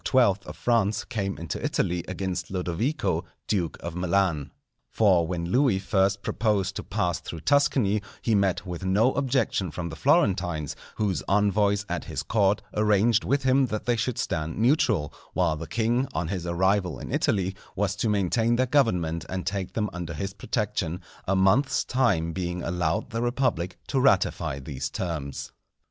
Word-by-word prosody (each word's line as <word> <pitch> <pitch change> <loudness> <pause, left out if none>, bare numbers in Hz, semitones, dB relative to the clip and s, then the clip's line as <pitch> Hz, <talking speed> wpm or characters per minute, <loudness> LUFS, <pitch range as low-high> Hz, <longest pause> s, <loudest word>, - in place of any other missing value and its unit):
of 105 -6 +3
France 110 -3 +1
came 100 -3 -3
into 85 -1 -5
Italy 85 0 0
against 95 0 -3
Lodovico, 95 - -1 0.2
duke 90 -6 -1
of 85 - -5
Milan. 90 -4 +1 0.4
For 95 -6 +3
when 85 0 -3
Louis 130 -5 +3
first 95 0 +1
proposed 100 -3 0
to - - -4
pass 90 -5 -1
through 80 - -8
Tuscany 125 - +3 0.2
he 115 - 0
met 100 -3 +1
with 90 0 -6
no 105 +7 +3
objection 130 -8 0
from 85 +2 -5
the 80 - -7
Florentines, 85 -7 +1 0.2
whose 95 - 0
envoys 100 0 +2
at - - -3
his 70 - -4
court 100 +3 +2
arranged 105 +2 +3
with 140 +1 +1
him 130 0 +4
that 110 -2 -4
they 120 - +2
should 120 +1 -1
stand 80 -9 -2
neutral, 115 - +2 0.2
while 85 -4 +2
the 80 +1 -7
king, 120 +5 +1
on 80 0 -2
his 90 -3 -3
arrival 95 +2 +1
in - - -7
Italy, 95 -2 +1 0.2
was 100 0 0
to 110 - 0
maintain 105 +4 +2
their 130 +2 +2
government 90 - +1
and 95 0 -3
take 95 -1 -3
them 105 -2 0
under 85 -2 -5
his 95 +5 -4
protection; 100 -4 -2 0.3
a 95 - +2
month's 95 +9 +3
time 95 -11 +1
being 90 -1 -3
allowed 85 +5 -1
the 115 0 -2
republic 120 -8 0
to 135 - 0
ratify 100 - +2
these 70 -1 -5
terms. 75 -7 -4
95 Hz, 160 wpm, -26 LUFS, 85-115 Hz, 0.4 s, him